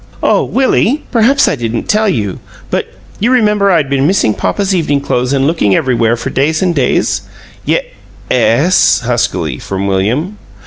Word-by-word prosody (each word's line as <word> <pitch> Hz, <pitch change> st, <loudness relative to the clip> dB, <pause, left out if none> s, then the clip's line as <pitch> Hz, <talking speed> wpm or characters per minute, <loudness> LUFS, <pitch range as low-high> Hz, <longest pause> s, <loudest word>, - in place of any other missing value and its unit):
"Oh, -, -, +2 dB
Willie, 265 Hz, +1 st, +1 dB
perhaps 260 Hz, +4 st, +3 dB
I -, -, +1 dB
didn't 115 Hz, -2 st, -3 dB
tell 215 Hz, 0 st, +2 dB
you, 105 Hz, -, -2 dB, 0.3 s
but -, -, -1 dB, 0.3 s
you 230 Hz, -, +1 dB
remember 210 Hz, -5 st, +2 dB
I'd 165 Hz, -6 st, +2 dB
been 140 Hz, +1 st, +1 dB
missing 180 Hz, -, +2 dB
papa's 200 Hz, -, -1 dB
evening 150 Hz, -6 st, 0 dB
clothes 125 Hz, -2 st, -1 dB
and 135 Hz, -1 st, +1 dB
looking 140 Hz, -, +1 dB
everywhere 120 Hz, -2 st, +1 dB
for -, -, -5 dB
days 155 Hz, +6 st, 0 dB
and 180 Hz, -2 st, +1 dB
days?" 135 Hz, -6 st, 0 dB, 0.4 s
"Ye -, -, +1 dB, 0.5 s
es," 130 Hz, +9 st, +3 dB
huskily 110 Hz, -, -1 dB
from 95 Hz, 0 st, -4 dB
William. 120 Hz, -, -1 dB
140 Hz, 160 wpm, -13 LUFS, 120-200 Hz, 0.5 s, perhaps